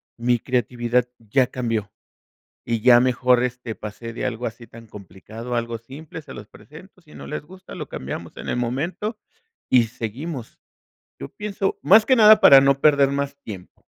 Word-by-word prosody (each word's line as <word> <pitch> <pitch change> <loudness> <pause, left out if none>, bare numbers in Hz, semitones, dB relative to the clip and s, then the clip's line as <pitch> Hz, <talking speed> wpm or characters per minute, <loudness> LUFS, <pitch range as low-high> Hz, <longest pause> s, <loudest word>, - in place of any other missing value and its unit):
mi 120 +1 +1
creatividad 120 0 -1
ya 125 +4 +1
cambió 115 -5 -3 0.8
y 115 -1 0
ya 120 +1 +7
mejor, 125 0 +2
este, 125 -2 -5
pasé 110 +2 -8
de 120 - -4
algo 125 -1 -4
así 120 +1 -8
tan 115 +1 -14
complicado, 105 +4 -9
algo 115 -1 -2
simple, 145 +7 -10
se 155 - -12
los 105 0 -10
presento, 185 +6 -16
si 155 -3 -19
no - - -10
les 150 - -5
gusta, 185 +4 -13
lo - - -7
cambiamos 65 +2 -7
en - - -8
el - - -1
momento 160 - -3 0.5
y 125 -2 +5
seguimos. 120 +4 -7 0.6
Yo 70 - -6
pienso 200 -2 -3
más 215 +3 +6
que 260 - +4
nada 215 -1 +7
para 135 - +9
no 140 0 +2
perder 140 -2 +4
más 140 0 -3
tiempo. 95 -5 -11
125 Hz, 170 wpm, -22 LUFS, 115-145 Hz, 0.8 s, para